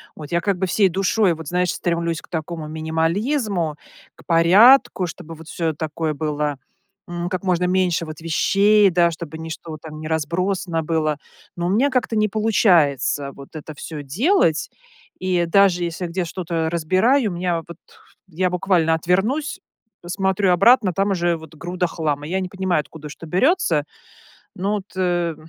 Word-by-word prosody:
Вот 150 0 -10
я 170 - +2
как 190 +2 -1
бы 190 +1 -1
всей 195 +2 +3
душой, 195 +1 +1
вот, 160 -1 -9
знаешь, 180 0 +1
стремлюсь 170 -1 -2
к - - -20
такому 160 -1 -5
минимализму, 165 - -1 0.4
к - - -19
порядку, 185 +5 +5
чтобы, 165 -1 -8
вот, 160 0 -13
всё, 165 -2 -1
э, - - -8
такое 155 +1 -3
было, 150 -1 -2 0.5
м, 175 0 -3
как 185 0 -3
можно 180 -1 +1
меньше 180 -2 +1
вот 155 0 -9
вещей, 200 +5 +3
да, 170 -1 +3
чтобы 160 -1 -7
ничто 160 0 -7
вот 155 - -8
там 155 -1 -9
не 155 - -6
разбросано 170 +2 -1
было. 155 -2 0 0.4
Ну, 175 - -2
у - - 0
меня 235 +9 +3
как-то 255 -4 -1
не 215 0 +2
получается, 165 - +2
вот 140 0 -12
это 155 +1 -8
всё 150 +1 -7
делать. 165 - +1 0.5
И 180 -2 0
даже 180 0 +3
если 170 +1 -3
где 180 +2 -2
что-то 165 -2 -3
разбираю, 185 - +2
меня 175 0 -1
вот- 170 -1 -10 0.5
я 180 +2 0
буквально 175 -3 +1
отвернусь, 195 - 0 0.4
посмотрю 190 +2 0
обратно, 195 +1 +5
там 195 +3 0
уже, 175 -2 +1
вот, 160 -1 -13
груда 180 +3 -3
хлама. 150 -4 -2
Я 190 +3 -1
не 185 -1 -4
понимаю, 190 -3 0
откуда 155 +1 -11
что 165 +2 -10
берется, 185 - +2 0.7
ну 195 +3 -1
вот, 205 -2 -3
э, 175 -3 0
175 Hz, 165 wpm, -21 LUFS, 160-190 Hz, 0.7 s, порядку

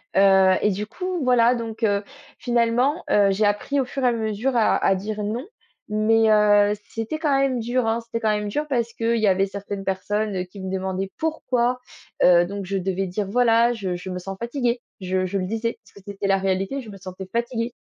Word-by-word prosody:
Heu 190 -1 +6
et 210 - +2
du 210 +3 -4
coup, 365 - -4
voilà 245 -1 +4
donc 230 -1 -5
heu, 205 -1 +2 0.4
finalement, 245 +6 +1
heu, 200 -1 +5
j'ai 210 +2 +1
appris 205 +7 0
au 260 - +1
fur 265 +1 -5
et - - +4
à - - +4
mesure 225 +3 -1
à 225 -2 +3
à 195 - +4
dire 210 +2 -4
non. 230 +7 -3 0.4
Mais 220 +1 +3
heu, 205 -1 +5 0.2
c'était 225 +7 -4
quand 295 -4 +1
même 265 -3 +1
dur 240 0 0
hein. 230 +1 0
C'était 230 0 -5
quand 215 -1 +1
même 210 0 -3
dur 300 +7 -2
parce 235 -4 -1
que 230 0 0
il 225 - 0
y 210 - +3
avait 190 +1 +3
certaines 200 0 -6
personnes 195 0 -1
qui 195 +2 -13
me 190 0 -5
demandaient 190 0 -3
pourquoi. 255 -6 0 0.4
Heu, 175 -1 +6
donc 200 +1 -5
je 195 +1 -2
devais 190 0 -2
dire: 200 +3 -3
«Voilà, 235 0 +4
je 195 -6 -3
je 180 +2 -7
me 180 0 -4
sens 195 +1 -7
fatiguée» 240 0 -1 0.2
je 185 0 -1
je 195 +2 -2
le 185 - -2
disais 225 +3 -3
parce - - -21
que 200 - -15
c'était 200 0 -3
la 195 0 +3
réalité, 195 +8 -1
je 225 - -11
me 200 - -9
sentais 185 0 -8
fatiguée. 235 0 -2
215 Hz, 220 wpm, -23 LUFS, 195-235 Hz, 0.4 s, Heu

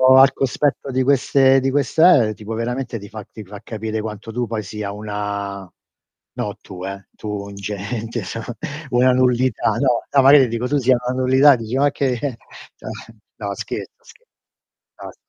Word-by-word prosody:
al 135 0 +7
cospetto 135 +1 -1
di 130 0 +1
queste 135 0 +4
di 135 0 0
queste 145 -2 +4
eh, - - -3
tipo 105 +1 -7
veramente 120 +2 -3
ti 100 -1 -10
fa 110 -1 -8
ti 110 - -10
fa 100 +1 -10
capire 110 0 -4
quanto 110 0 -6
tu 120 +1 -2
poi 110 -1 -3
sia 100 +1 -5
una 100 -2 -5 0.7
no - - -3
tu, 90 0 -9
eh 100 -1 -7
tu - - -9
un 100 -1 -5
gente, 105 +3 -4 0.7
una 125 +1 +4
nullità. 125 -3 +2
No, 120 +2 +1
no 140 - +4
magari 135 0 +7
dico 115 +2 -2
tu 145 - +1
sia 130 -2 +3
una 125 +1 -1
nullità, 130 +2 +6
dici 115 +1 -5
ma 140 +2 +3
che 135 -2 0
eh 125 0 -3 1.0
no 100 -2 -4
scherzo, - - -7
scherzo. - - -20 0.7
No - - -7
s - - -23
115 Hz, 175 wpm, -20 LUFS, 105-130 Hz, 1.0 s, al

